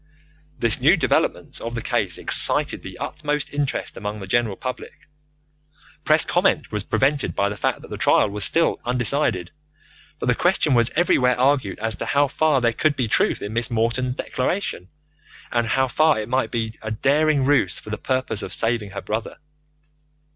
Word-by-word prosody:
This 115 Hz, -3 st, +1 dB
new -, -, +5 dB
development -, -, -1 dB
of 115 Hz, +1 st, -5 dB
the 115 Hz, -, -3 dB
case -, -, -1 dB
excited -, -, +5 dB
the -, -, -10 dB
utmost 150 Hz, -1 st, -4 dB
interest 145 Hz, -2 st, -3 dB
among 105 Hz, +1 st, -5 dB
the 95 Hz, -, -7 dB
general 110 Hz, +1 st, 0 dB
public. 130 Hz, +5 st, -8 dB, 1.0 s
Press -, -, +4 dB
comment -, -, 0 dB
was 105 Hz, -, -2 dB
prevented 135 Hz, +7 st, 0 dB
by 100 Hz, 0 st, +1 dB
the 105 Hz, -, -5 dB
fact 100 Hz, -, -2 dB
that -, -, -13 dB
the -, -, -5 dB
trial -, -, +3 dB
was 105 Hz, 0 st, -2 dB
still 165 Hz, +9 st, +2 dB
undecided, 120 Hz, -, -1 dB, 0.7 s
but -, -, -5 dB
the 125 Hz, -, +3 dB
question 175 Hz, 0 st, +1 dB
was 120 Hz, 0 st, +3 dB
everywhere 125 Hz, -7 st, +2 dB
argued 130 Hz, -7 st, +1 dB
as 110 Hz, 0 st, -3 dB
to -, -, -5 dB
how 140 Hz, +1 st, +2 dB
far 145 Hz, 0 st, +1 dB
there 115 Hz, -1 st, +1 dB
could 150 Hz, +5 st, +1 dB
be 125 Hz, -4 st, -1 dB
truth -, -, +1 dB
in 100 Hz, +1 st, -5 dB
Miss 115 Hz, +1 st, +1 dB
Morton's 120 Hz, +2 st, -1 dB
declaration, 130 Hz, -, -3 dB, 0.6 s
and 120 Hz, -1 st, 0 dB
how 130 Hz, +5 st, +1 dB
far 155 Hz, 0 st, +2 dB
it 105 Hz, -, -5 dB
might 130 Hz, +1 st, 0 dB
be 115 Hz, -2 st, -3 dB
a 110 Hz, -, -5 dB
daring 140 Hz, +5 st, +1 dB
ruse 135 Hz, -10 st, +2 dB
for 110 Hz, -, -9 dB
the 105 Hz, -, -4 dB
purpose 130 Hz, -5 st, -2 dB
of -, -, -7 dB
saving 115 Hz, -2 st, +1 dB
her 100 Hz, +1 st, -7 dB
brother. 110 Hz, +1 st, -4 dB
120 Hz, 180 wpm, -22 LUFS, 110-140 Hz, 1.0 s, new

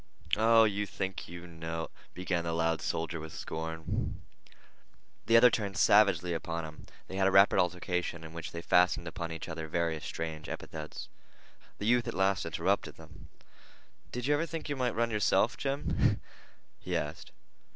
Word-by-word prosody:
"Oh, 115 Hz, +1 st, +6 dB
you 105 Hz, -1 st, +1 dB
think 95 Hz, -1 st, -4 dB
you 85 Hz, +1 st, -9 dB
know—" 80 Hz, -1 st, -5 dB, 0.2 s
began 90 Hz, -2 st, -1 dB
the 85 Hz, -1 st, -2 dB
loud 80 Hz, -1 st, +1 dB
soldier 80 Hz, 0 st, -2 dB
with 80 Hz, 0 st, -8 dB
scorn. 80 Hz, 0 st, -4 dB, 1.1 s
The 115 Hz, 0 st, +7 dB
other 125 Hz, +1 st, +8 dB
turned 100 Hz, -4 st, -2 dB
savagely 90 Hz, -4 st, +5 dB
upon 85 Hz, 0 st, -3 dB
him. 75 Hz, -1 st, -11 dB, 0.2 s
They 95 Hz, -, -6 dB
had 95 Hz, 0 st, +3 dB
a -, -, +3 dB
rapid 95 Hz, +1 st, +6 dB
altercation, 90 Hz, -2 st, -1 dB
in 80 Hz, 0 st, -10 dB
which 85 Hz, -1 st, -6 dB
they 85 Hz, 0 st, -6 dB
fastened 90 Hz, -1 st, +3 dB
upon 85 Hz, 0 st, -5 dB
each 80 Hz, -, -6 dB
other 80 Hz, -1 st, -5 dB
various 80 Hz, -1 st, -1 dB
strange 80 Hz, -1 st, -5 dB
epithets. 80 Hz, -1 st, -6 dB, 0.7 s
The 105 Hz, -, -4 dB
youth 120 Hz, +1 st, +3 dB
at -, -, -3 dB
last 95 Hz, -2 st, +1 dB
interrupted 85 Hz, +5 st, 0 dB
them. -, -, -14 dB, 0.8 s
"Did 125 Hz, 0 st, -4 dB
you 145 Hz, -, +3 dB
ever 160 Hz, +3 st, +1 dB
think 165 Hz, -2 st, -5 dB
you 145 Hz, -, -1 dB
might 125 Hz, -3 st, -1 dB
run 115 Hz, +1 st, +1 dB
yourself, 105 Hz, +2 st, +3 dB
Jim?" 140 Hz, +1 st, 0 dB, 0.6 s
he -, -, -2 dB
asked. 75 Hz, +3 st, -5 dB
90 Hz, 165 wpm, -31 LUFS, 80-105 Hz, 1.1 s, other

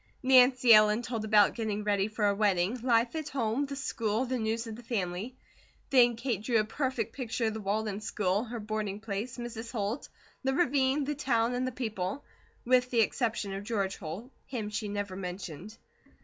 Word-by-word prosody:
Nancy 255 Hz, -2 st, +6 dB
Ellen 215 Hz, +2 st, +5 dB
told 230 Hz, -3 st, -3 dB
about 210 Hz, -2 st, +5 dB
getting 215 Hz, -3 st, -2 dB
ready 205 Hz, -1 st, +1 dB
for 215 Hz, 0 st, -4 dB
her 200 Hz, -, +4 dB
wedding, 200 Hz, 0 st, +1 dB
life 235 Hz, +1 st, +2 dB
at 310 Hz, -2 st, -3 dB
home, 260 Hz, +1 st, -1 dB
the 280 Hz, -, -5 dB
school, 230 Hz, -3 st, -1 dB
the 255 Hz, 0 st, -2 dB
news 225 Hz, +1 st, -1 dB
of 225 Hz, -1 st, -6 dB
the 240 Hz, -, -10 dB
family; 210 Hz, 0 st, -3 dB, 0.6 s
the 245 Hz, -3 st, +6 dB
Kate 230 Hz, -3 st, -2 dB
drew 230 Hz, +1 st, +1 dB
a -, -, +3 dB
perfect 230 Hz, -1 st, -2 dB
picture 240 Hz, -3 st, -2 dB
of 220 Hz, -, 0 dB
the 220 Hz, -, -5 dB
Walden 210 Hz, +1 st, -2 dB
school, 205 Hz, -1 st, 0 dB
her 235 Hz, 0 st, -6 dB
boarding 210 Hz, -1 st, -3 dB
place, 220 Hz, +4 st, -4 dB
Mrs. 235 Hz, -1 st, -6 dB
Holt, 220 Hz, +2 st, -3 dB, 0.3 s
the 265 Hz, 0 st, +1 dB
ravine, 275 Hz, -2 st, +2 dB
the 295 Hz, +2 st, -1 dB
town 245 Hz, -4 st, +1 dB
and 250 Hz, +1 st, -1 dB
the -, -, -2 dB
people, 220 Hz, -1 st, -4 dB, 0.4 s
with 250 Hz, 0 st, +3 dB
the 235 Hz, -2 st, +3 dB
exception 220 Hz, -3 st, -1 dB
of 195 Hz, +1 st, -5 dB
George 200 Hz, -3 st, -2 dB
Holt 195 Hz, +9 st, -7 dB, 0.2 s
him 220 Hz, -5 st, -4 dB
she 210 Hz, 0 st, -3 dB
never 205 Hz, -2 st, -3 dB
mentioned. 185 Hz, +2 st, -7 dB
225 Hz, 190 wpm, -30 LUFS, 205-250 Hz, 0.6 s, Nancy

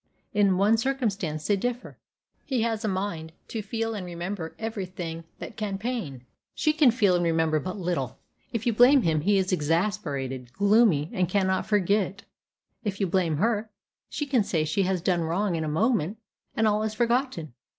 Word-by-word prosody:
In 200 Hz, -3 st, +3 dB
one 210 Hz, +4 st, +4 dB
circumstance 215 Hz, -, -1 dB
they 205 Hz, -, +3 dB
differ. 245 Hz, +5 st, -3 dB, 0.5 s
He 255 Hz, -5 st, 0 dB
has 225 Hz, -1 st, -1 dB
a -, -, 0 dB
mind 185 Hz, -5 st, -3 dB, 0.2 s
to 225 Hz, -, -3 dB
feel 225 Hz, +2 st, -3 dB
and 205 Hz, -3 st, -4 dB
remember 175 Hz, 0 st, -5 dB
every 220 Hz, -4 st, -4 dB
thing 165 Hz, -2 st, -6 dB
that -, -, -8 dB
can 205 Hz, -3 st, -2 dB
pain; 195 Hz, -, -4 dB, 0.3 s
she 305 Hz, -, +2 dB
can 305 Hz, -4 st, +5 dB
feel 220 Hz, -5 st, +3 dB
and 175 Hz, -, +1 dB
remember 160 Hz, -2 st, +2 dB
but 185 Hz, +7 st, -5 dB
little. 165 Hz, -9 st, -2 dB, 0.3 s
If 230 Hz, -1 st, -3 dB
you 235 Hz, -, +2 dB
blame 250 Hz, +4 st, +6 dB
him, 155 Hz, -2 st, +2 dB
he 200 Hz, +5 st, +3 dB
is 190 Hz, 0 st, 0 dB
exasperated, 145 Hz, -, -1 dB
gloomy, 200 Hz, -7 st, +3 dB
and 180 Hz, -2 st, 0 dB
cannot 190 Hz, -1 st, +1 dB
forget 205 Hz, 0 st, +3 dB
it. 200 Hz, +2 st, -6 dB, 0.6 s
If 200 Hz, -3 st, -3 dB
you 200 Hz, -, +2 dB
blame 175 Hz, -4 st, +1 dB
her, 215 Hz, +3 st, 0 dB, 0.4 s
she 295 Hz, -, -3 dB
can 265 Hz, -6 st, +2 dB
say 160 Hz, -5 st, 0 dB
she 155 Hz, +6 st, 0 dB
has 185 Hz, -2 st, 0 dB
done 180 Hz, -3 st, +2 dB
wrong 175 Hz, +3 st, 0 dB
in 160 Hz, -, -1 dB
a -, -, -2 dB
moment, 195 Hz, +3 st, +1 dB, 0.4 s
and 220 Hz, -, +3 dB
all 210 Hz, 0 st, +2 dB
is 215 Hz, 0 st, -2 dB
forgotten. 240 Hz, -, 0 dB
195 Hz, 185 wpm, -26 LUFS, 165-220 Hz, 0.6 s, blame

